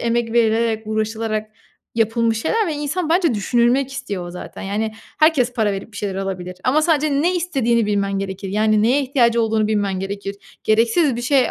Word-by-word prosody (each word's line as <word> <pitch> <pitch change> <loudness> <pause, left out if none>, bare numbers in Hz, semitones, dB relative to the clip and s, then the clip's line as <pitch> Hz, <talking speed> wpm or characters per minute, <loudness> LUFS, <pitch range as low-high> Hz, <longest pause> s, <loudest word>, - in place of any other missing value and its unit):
emek 235 -1 0
verilerek, 225 -1 +2
uğraşılarak 215 0 -2 0.4
yapılmış 225 0 +1
şeyler 450 -2 +1
ve 315 - -2
insan 300 +4 -2
bence 335 -5 +2
düşünülmek 240 +5 +1
istiyor 200 -10 -5
zaten. 180 - -9
Yani, 215 +3 -2 0.3
herkes 305 -6 +3
para 220 -4 +1
verip 195 +3 -6
bir - - -11
şeyler 200 -2 -3
alabilir 185 -2 -4
ama 290 +5 +3
sadece 305 -2 +2
ne 360 +2 +2
istediğini 250 -10 +1
bilmen 200 -1 0
gerekir. 195 0 -5
Yani 215 +1 +2
neye 255 +6 +3
ihtiyacı 235 -3 +2
olduğunu 220 -1 +1
bilmen 200 -3 0
gerekir. 200 +1 -5 0.3
Gereksiz 235 +6 +3
bir 240 - -4
şey 255 -1 +3
225 Hz, 170 wpm, -20 LUFS, 210-270 Hz, 0.4 s, herkes